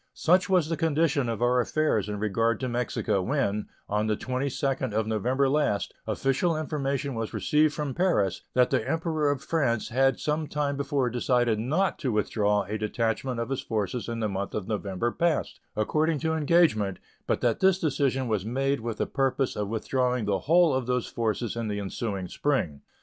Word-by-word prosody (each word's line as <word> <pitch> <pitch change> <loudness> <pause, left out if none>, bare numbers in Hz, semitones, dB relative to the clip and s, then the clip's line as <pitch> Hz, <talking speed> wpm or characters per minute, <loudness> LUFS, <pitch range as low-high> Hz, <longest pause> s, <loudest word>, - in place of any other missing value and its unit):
Such 185 +4 +3
was 180 -5 +3
the 165 0 -2
condition 155 -5 +1
of 115 +1 -2
our 125 +1 +3
affairs 120 -5 +1
in 105 - -3
regard 110 +2 +1
to 130 - -1
Mexico 120 -4 -1
when, 105 -3 -1 0.2
on 105 +1 0
the 105 -1 0
22d 130 -1 -2
of 110 0 +1
November 125 +6 +1
last, 135 - 0
official 155 +5 +1
information 140 -3 -2
was 115 -1 -4
received 150 0 +2
from 150 -3 -3
Paris 105 - +1
that 125 -1 +4
the - - 0
Emperor 160 -2 0
of 140 -2 -1
France 130 -9 0
had 135 +2 +2
some 150 0 -1
time 145 -1 -1
before 140 -3 0
decided 120 -2 +1
not 155 - 0
to 130 - -1
withdraw 105 -1 +1
a 105 +3 -4
detachment 115 +3 -1
of 115 - -3
his 135 - -1
forces 110 +2 -2
in 115 -1 -3
the 110 - +1
month 100 0 -4
of 105 -3 -3
November 105 +1 -2
past, 170 0 0 0.2
according 155 +9 +1
to 160 0 0
engagement, 150 - +3 0.3
but - - 0
that 120 -2 +1
this 190 -1 +4
decision 135 -6 0
was 105 -4 0
made 135 +5 0
with 115 -1 -4
the - - 0
purpose 135 -1 0
of 105 -1 -2
withdrawing 125 +1 0
the 100 -2 +1
whole 170 -2 +5
of 130 -2 -1
those 125 -1 0
forces 115 0 -2
in 115 -1 -2
the 105 -1 -2
ensuing 100 -1 -3
spring. 90 - -1
125 Hz, 185 wpm, -27 LUFS, 110-145 Hz, 0.3 s, whole